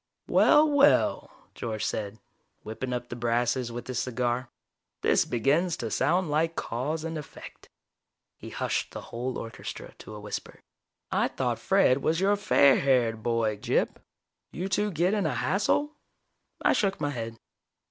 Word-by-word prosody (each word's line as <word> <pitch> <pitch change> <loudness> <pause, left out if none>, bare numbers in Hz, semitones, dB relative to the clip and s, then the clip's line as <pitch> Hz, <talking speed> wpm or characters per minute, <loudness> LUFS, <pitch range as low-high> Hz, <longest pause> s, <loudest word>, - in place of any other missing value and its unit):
"Well, 305 +1 +5
well," 290 -1 +3 0.2
George 110 -2 -4
said, 105 0 -3 0.5
whipping 110 +4 -5
up 120 0 -4
the - - -5
brasses 120 +1 0
with 120 +1 -6
his 130 -2 -3
cigar. 125 0 -1 0.5
"This - - +3
begins 150 +9 +1
to 115 -2 -4
sound 175 - +1
like 165 +2 +1
cause 145 +7 -3
and 165 -1 -4
effect." 150 - -12 0.7
He - - -10
hushed - - -2
the - - -6
whole 125 +2 -3
orchestra 115 - -7
to 110 - -10
a - - -8
whisper. 105 0 -7 0.5
"I - - +2
thought - - -2
Fred 130 +2 +3
was 160 +4 +1
your 200 +2 +3
fair 140 -8 +5
haired 120 -5 +2
boy, 115 -2 0
Gyp. - - 0 0.5
You 180 +3 -4
two 205 +2 0
get 180 +2 +1
in 205 -6 +1
a - - -2
hassle?" 250 +9 +1 0.7
I - - +4
shook 195 -2 0
my 145 -1 -1
head. 115 -3 -5
130 Hz, 155 wpm, -27 LUFS, 115-170 Hz, 0.7 s, Well